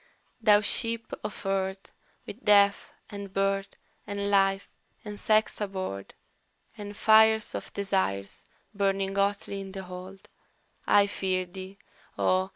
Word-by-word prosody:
"Thou 210 -2 +6
Ship 230 +2 -1
of 210 - -6
Earth, 195 0 -2 0.3
with 230 +6 -10
Death, 200 -1 +4 0.2
and 200 -1 -7
Birth, 195 0 -1 0.3
and 200 0 -2
Life, 195 0 +3 0.4
and 210 -1 -7
Sex 215 0 +1
aboard, 185 - -5 0.6
And 205 0 -8
fires 220 0 +5
of - - -6
Desires 190 - -2 0.3
burning 195 -1 0
hotly 200 0 -1
in 195 -1 -9
the 195 -1 -6
hold, 185 +1 -10 0.6
I 205 0 +6
fear 190 -2 -1
thee, 190 +2 -10 0.4
O! 185 +1 +2
195 Hz, 125 wpm, -28 LUFS, 190-205 Hz, 0.6 s, Thou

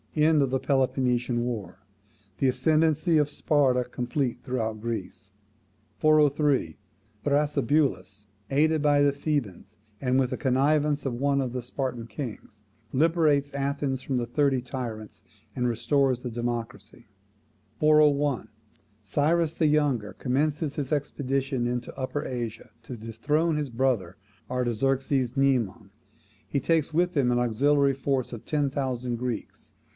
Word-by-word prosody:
End 155 0 +4
of 135 - +2
the 130 +1 0
Peloponnesian 125 -3 +1
war. 100 -7 -5 0.6
The 135 - +3
ascendancy 155 +3 +2
of 150 -1 +2
Sparta 135 -4 +2
complete 125 0 -3
throughout 110 -4 -3
Greece. 115 -2 -5 0.7
403. 150 - +3 0.5
Thrasybulus, 140 -8 0 0.2
aided 155 +2 +2
by 145 -1 +4
the 140 -1 +3
Thebans 130 - -3 0.2
and 130 0 +2
with 130 -2 +1
the - - -2
connivance 145 +2 +1
of 135 - -1
one 140 +3 +1
of 130 -3 -2
the 125 - -3
Spartan 125 -1 -4
kings, 115 -5 -8 0.3
liberates 150 -1 +2
Athens 140 -1 -2
from 130 -1 -2
the 120 - -1
Thirty 140 0 +1
Tyrants, 120 -4 -6 0.3
and 125 -1 0
restores 130 +2 +1
the 125 -2 -5
democracy. 115 -2 -5 0.7
401. 145 -5 +3 0.5
Cyrus 155 - +1
the 160 - +1
Younger 145 -8 +1
commences 145 +3 -1
his 140 -3 -4
expedition 135 -3 -1
into 120 0 -4
Upper 135 +2 -3
Asia 120 -3 -5
to 125 +1 -8
dethrone 145 +9 0
his 150 -2 -2
brother 115 -7 -1 0.3
Artaxerxes 130 +1 0
Mnemon. 120 -7 +1 0.5
He 140 - -1
takes 160 0 +1
with 175 +2 +1
him 130 -4 +2
an 120 - +2
auxiliary 140 +4 +2
force 135 -2 -2
of 115 - -7
ten 145 -2 0
thousand 125 -3 -2
Greeks. 125 -2 -5
135 Hz, 130 wpm, -26 LUFS, 120-145 Hz, 0.7 s, End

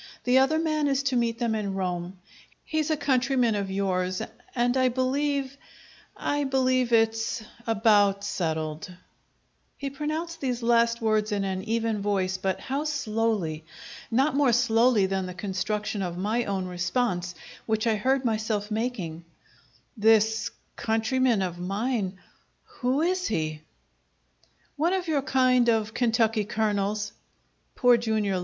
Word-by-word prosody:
The 250 +1 +4
other 270 +4 +3
man 310 -2 +1
is 275 0 +1
to 275 -2 0
meet 235 -1 +1
them 235 -2 0
in 205 -3 -2
Rome. 180 -1 -3 0.5
He's 310 0 -1
a 310 - +1
countryman 255 -4 +2
of 200 -2 -2
yours, 185 -1 -1 0.4
and 245 0 +2
I 260 -1 +3
believe 270 +2 -1 0.6
I 290 0 -1
believe 255 -2 +1
it's 225 0 +1 0.2
about 205 -3 +3
settled!" 160 -4 -3 0.9
He 275 -1 -4
pronounced 310 +4 -4
these 250 -3 -2
last 235 0 +3
words 215 -1 +1
in 200 -1 0
an 190 -1 -2
even 225 -1 -1
voice, 190 -2 0
but 190 0 -2
how 280 +3 -2
slowly! 220 - -1 0.5
Not 270 +5 +2
more 280 -4 +3
slowly 230 -2 +4
than 190 -1 -1
the 180 - -7
construction 205 +2 -2
of 175 -2 -3
my 215 +6 0
own 195 -2 -2
response, 180 0 -1 0.3
which 220 0 0
I 225 - +3
heard 260 +5 +1
myself 215 -2 -1
making: 210 -8 -3 0.7
"This 220 0 +3 0.3
countryman 225 0 +1
of 175 -1 -4
mine 195 +1 -2 0.5
who 280 - -1
is 365 +1 0
he?" 155 -6 -2 1.2
"One 330 +5 +2
of 370 -2 -1
your 300 -3 +1
kind 255 -2 +3
of 220 -1 +1
Kentucky 225 -3 +2
Colonels," 205 -1 -1 0.6
Poor 245 -2 +5
Jr. 215 -4 0
225 Hz, 135 wpm, -26 LUFS, 200-255 Hz, 1.2 s, Poor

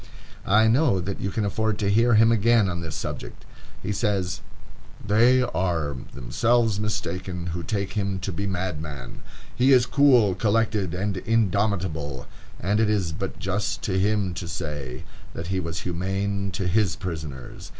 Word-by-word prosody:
I 105 +3 +5
know 115 -3 +3
that 95 +2 -4
you 100 - -1
can 105 +1 -1
afford 110 +1 0
to 100 -2 0
hear 115 +2 +4
him 115 +1 +6
again 115 -1 +4
on 85 -2 -3
this 80 -1 -5
subject. - - -6 0.4
He 105 - -2
says: 95 -4 -1 0.6
"They 120 +5 +4
are 80 - -1 0.2
themselves 115 - +1
mistaken 90 -3 -3
who 85 - -3
take 100 +4 -2
him 100 -2 -1
to 100 - -3
be 100 +3 -3
a - - -2
madman.... 80 -9 -5 0.3
He 130 +3 +4
is 125 -2 +6
cool, 125 -8 +5
collected, 105 -2 +1
and 100 +1 -2
indomitable, 95 - 0 0.3
and 100 +5 +1
it 110 -1 +3
is 100 -6 +1
but 95 +5 -5
just 95 +2 -2
to 95 -2 0
him 100 -2 +1
to 85 - -5
say, 70 -6 -5 0.3
that 85 - -5
he 95 - +1
was 80 -4 -4
humane 95 +3 -2
to 95 - -2
his 100 -1 +2
prisoners.... 80 -8 -7
100 Hz, 160 wpm, -25 LUFS, 85-110 Hz, 0.6 s, him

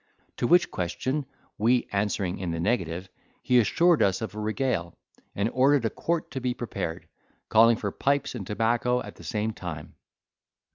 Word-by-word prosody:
To 120 - 0
which 175 +4 +4
question 130 - -2 0.3
we 120 +3 +3
answering 100 -2 -1
in 90 -2 -3
the 85 0 -2
negative, 90 -3 -1 0.4
he 125 -1 +4
assured 170 - +3
us 95 -1 +3
of 110 -1 -5
a 105 - -6
regale, 110 -5 -1 0.4
and 100 +2 +1
ordered 135 -1 +4
a 110 - 0
quart 170 -1 -2
to 130 - -4
be 125 0 -1
prepared, 95 -8 -5 0.4
calling 115 +1 +6
for 100 -2 -3
pipes 140 +3 0
and 105 -7 -6
tobacco 120 +3 +1
at - - -10
the - - -13
same 110 -1 -2
time. 80 -6 -7
110 Hz, 165 wpm, -27 LUFS, 95-125 Hz, 0.4 s, calling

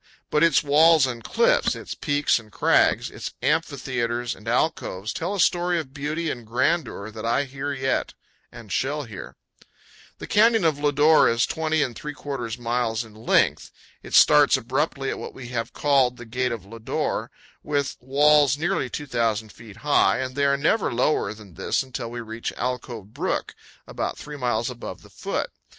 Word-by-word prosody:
But 150 - +2
its 165 -1 +4
walls 155 +1 +5
and 120 -3 -5
cliffs, - - +2
its - - -7
peaks 145 -3 +1
and 110 -2 -16
crags, - - +2
its - - -7
amphitheaters 125 -6 -1
and - - -15
alcoves, 95 +4 -1
tell 180 +5 -3
a - - -4
story 175 0 +2
of 135 -4 -7
beauty 150 +3 -2
and 120 - -6
grandeur 120 -2 -1
that 110 0 -8
I 120 +5 +1
hear 140 +1 -5
yet 135 -1 -1 0.4
and 115 -4 -12
shall 145 - -1
hear. 110 -7 -9 0.8
The - - -7
Canyon 225 -2 +4
of 155 -3 +2
Lodore 145 +2 +4
is 115 0 +2
20 160 -1 0
3/4 140 -5 -5
miles 120 -1 -1
in 110 - -15
length. 110 +1 +1 0.3
It - - -4
starts - - +6
abruptly - - -1
at - - -5
what - - -8
we 125 -3 -9
have 115 -2 -3
called 135 -4 +2
the 120 - -9
Gate 125 +2 -1
of 115 -5 -5
Lodore, 115 +2 -3 0.3
with 145 -2 -1
walls 145 +1 +4
nearly 165 -4 -1
2,000 115 -6 -2
feet 110 -2 -14
high, 145 - +4
and 130 0 -3
they 140 +1 +1
are 140 0 +3
never 165 +9 +1
lower 120 -3 +1
than 105 -4 -14
this 85 - -1
until 130 -2 -6
we 120 0 -6
reach 115 0 -5
Alcove 120 -4 -4
Brook, - - -2 0.3
about - - -4
three 150 0 -8
miles 120 -4 -1
above 125 -2 -7
the - - -17
foot. - - -3
130 Hz, 170 wpm, -24 LUFS, 115-150 Hz, 0.8 s, starts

